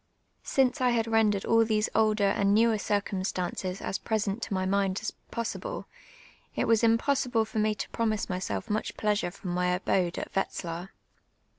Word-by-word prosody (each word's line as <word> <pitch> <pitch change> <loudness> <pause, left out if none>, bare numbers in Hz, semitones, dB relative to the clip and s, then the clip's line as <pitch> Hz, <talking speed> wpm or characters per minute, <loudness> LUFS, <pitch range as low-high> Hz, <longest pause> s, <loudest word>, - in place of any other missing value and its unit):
Since 265 +1 +1
I 250 - +4
had 235 -2 +2
rendered 220 -3 +2
all 230 0 +5
these 215 -1 +1
older 215 -1 +3
and 200 0 +2
newer 225 -1 +4
circumstances 190 -2 -2
s - - -2
])resent 215 0 0
to - - -3
my 185 0 0
mind 195 0 +1
as - - -2 0.2
possible, 230 -1 -4 0.7
it - - 0
was 230 0 +3
impossible 230 +1 +2
f(;r 220 0 -1
nu' 215 0 +1
to - - -4
loniise 220 -2 0
myself 185 +4 -3
much 215 -1 -2
ijleasure 210 -4 0
from 180 -1 -6
my 180 0 0
abode 180 0 +1
at - - -6
Wet/lar. 175 -2 -3
210 Hz, 165 wpm, -28 LUFS, 190-225 Hz, 0.7 s, all